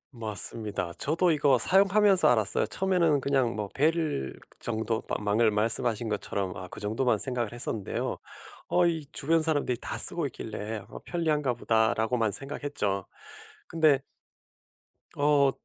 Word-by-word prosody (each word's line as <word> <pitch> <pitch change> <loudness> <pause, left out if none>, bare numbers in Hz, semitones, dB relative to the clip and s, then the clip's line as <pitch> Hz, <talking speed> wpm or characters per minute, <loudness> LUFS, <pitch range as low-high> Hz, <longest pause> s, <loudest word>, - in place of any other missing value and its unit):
맞습니다. 105 -4 -2
저도 170 +4 +2
이거 145 -4 +3
사용하면서 195 - +4
알았어요. 110 -4 +1
처음에는 175 -6 +1
그냥 135 -3 0
뭐 105 -2 -4
벨 155 - -1 0.2
정도 110 -1 -2
방금 105 +1 0
말씀하신 115 +1 +1
것처럼 100 -2 -3
아 95 - -8
그 - - -10
정도만 110 +3 0
생각을 120 -1 +1
했었는데요. 115 -4 -3 0.5
어 175 0 +3
이 160 -4 -1
주변 160 +3 +1
사람들이 145 -6 0
다 - - -5
쓰고 170 -4 +4
있길래 110 -3 -6
'어 - - -10
편리한가 150 -7 -1
보다.'라고만 110 0 +1
생각했죠. 135 -8 -1 0.6
근데 155 -4 +2 1.1
어 145 -1 +3
125 Hz, 305 characters per minute, -27 LUFS, 110-155 Hz, 1.1 s, 사용하면서